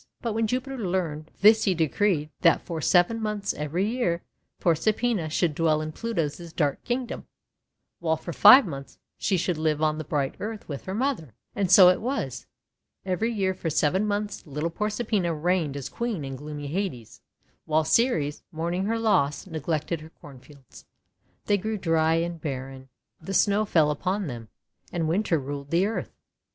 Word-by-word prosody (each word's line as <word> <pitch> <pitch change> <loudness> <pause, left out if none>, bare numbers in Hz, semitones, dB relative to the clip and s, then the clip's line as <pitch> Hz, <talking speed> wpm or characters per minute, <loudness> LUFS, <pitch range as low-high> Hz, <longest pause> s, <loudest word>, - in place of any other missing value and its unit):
But 230 -2 -2
when 225 0 +1
Jupiter 255 +3 -3
learned 175 -6 -2
this 220 +2 +6
he 190 -3 +2
decreed 160 -1 +1
that 170 - +4
for 165 -3 -4
seven 180 +8 +3
months 210 -2 -2
every 160 +7 -1
year 215 -8 -1 0.4
Proserpina 195 +2 +1
should 160 +1 +1
dwell 155 0 +2
in 155 0 -4
Pluto's 170 -5 -3
dark 145 -4 0
Kingdom, 245 0 -3 0.7
while 160 -2 0
for 170 +2 -7
five 235 - +9
months 140 -6 -8 0.2
she 195 - +1
should 175 -2 -1
live 155 -1 +1
on 155 0 +1
the - - -3
bright 145 -2 -1
earth 215 0 -6
with 140 -3 -6
her 190 - -4
mother. 220 - -2 0.2
And 195 -3 0
so 185 -1 +9
it 180 - +2
was. 215 - -3 0.6
Every 195 +5 0
year 195 -4 0
for 180 -3 -4
seven 170 +7 +1
months 205 0 -2
little 150 +3 -3
Proserpina 210 -3 -1
reigned 160 -3 0
as 135 -4 -5
Queen 220 - -3
in 135 0 -5
gloomy 145 +1 -7
Hades, 145 - -4 0.4
while 155 0 +2
Ceres, 155 - +1
mourning 170 +4 -2
her 225 +2 0
loss, 180 -11 +1
neglected 160 -1 -3
her 155 - -11
cornfields. 140 -2 -15 0.6
They 205 -1 +2
grew 215 +3 -2
dry 165 -3 +2
and 170 0 -2
barren, 135 -2 -6 0.3
the 195 +5 -4
Snow 205 +3 +3
fell 160 -7 +3
upon 185 +7 -2
them, 120 -6 -7 0.4
and 165 -2 -1
Winter 175 +1 +1
ruled 140 0 -6
the 170 +4 +3
earth. 220 +2 -4
170 Hz, 165 wpm, -26 LUFS, 150-205 Hz, 0.7 s, five